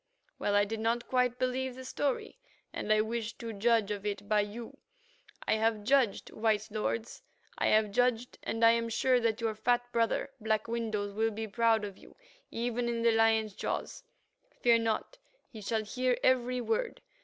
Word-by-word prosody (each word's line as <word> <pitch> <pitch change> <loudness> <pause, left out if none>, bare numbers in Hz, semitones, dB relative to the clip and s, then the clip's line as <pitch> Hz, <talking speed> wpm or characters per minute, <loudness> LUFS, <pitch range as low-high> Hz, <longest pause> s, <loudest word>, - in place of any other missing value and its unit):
"Well 205 - 0
I 205 0 +4
did 220 +2 -4
not 230 +2 0
quite 250 -1 +1
believe 255 0 -1
the 260 0 -9
story, 280 - -2 0.3
and 215 - -3
I 215 0 +5
wished 225 0 -3
to 230 -2 -6
judge 220 0 +2
of 205 -1 -4
it 205 -1 -4
by 215 0 +3
you. 220 +3 -7 0.7
I 220 - +3
have 220 -1 +1
judged, 250 -3 +2
white 215 -1 0
lords, 220 +1 -3 0.4
I - - +2
have 215 -1 +3
judged, 245 +2 +1
and 225 0 +1
I 230 - +8
am 230 0 0
sure 250 +2 +2
that 230 -1 0
your 225 -1 0
fat 240 +3 +1
brother, 230 +4 0
Black 220 -1 0
Windows, 220 -3 -2
will 220 +2 +1
be 220 0 -5
proud 225 0 +2
of 200 -2 -9
you - - -17 0.3
even 240 +1 -2
in 230 -1 -1
the 235 - +5
lion's 225 -1 +3
jaws. - - -4 0.6
Fear 235 -1 +5
not; 225 - -2 0.3
he 220 - -9
shall 220 +2 -1
hear 250 +3 0
every 250 -1 +2
word. 455 - -2
230 Hz, 180 wpm, -31 LUFS, 215-245 Hz, 0.7 s, I